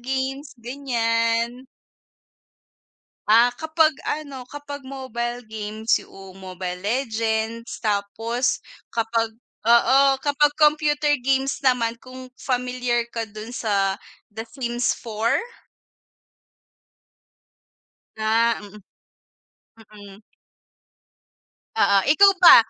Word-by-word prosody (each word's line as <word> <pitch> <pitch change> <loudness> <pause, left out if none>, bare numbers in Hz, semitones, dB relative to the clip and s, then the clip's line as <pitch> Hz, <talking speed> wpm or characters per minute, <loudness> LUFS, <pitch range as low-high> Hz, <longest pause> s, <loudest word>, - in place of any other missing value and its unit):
games, 265 +2 -3
ganyan. 235 -1 -1 1.6
Ah, 230 +3 +6
kapag 315 0 +3 0.2
ano 280 -4 -4
kapag 285 -1 -8
mobile 245 -2 -4
games 220 +1 -1
'yoong 195 -1 -13
Mobile 185 -1 -6
Legends. 225 0 -2
Tapos, 225 +4 -1 0.2
kapag 225 -1 -1 0.3
oo, 265 +4 +5
kapag 295 0 +2
computer 300 -1 +3
games 270 +2 0
naman 235 -3 +1
kung 255 0 -11
familiar 250 -2 -1
ka 230 -1 -3
do'n 215 +2 -9
sa 200 -4 0 0.3
The 225 +2 -7
Sims 240 -1 -1
4? 230 - 0 2.8
Ah, 225 +1 +2
mm. 205 0 -12 1.2
Mm. 200 0 -13 1.6
Oo. 200 0 +4
Ikaw 395 +7 +7
ba, 355 -2 +10
235 Hz, 85 wpm, -23 LUFS, 220-270 Hz, 2.8 s, ba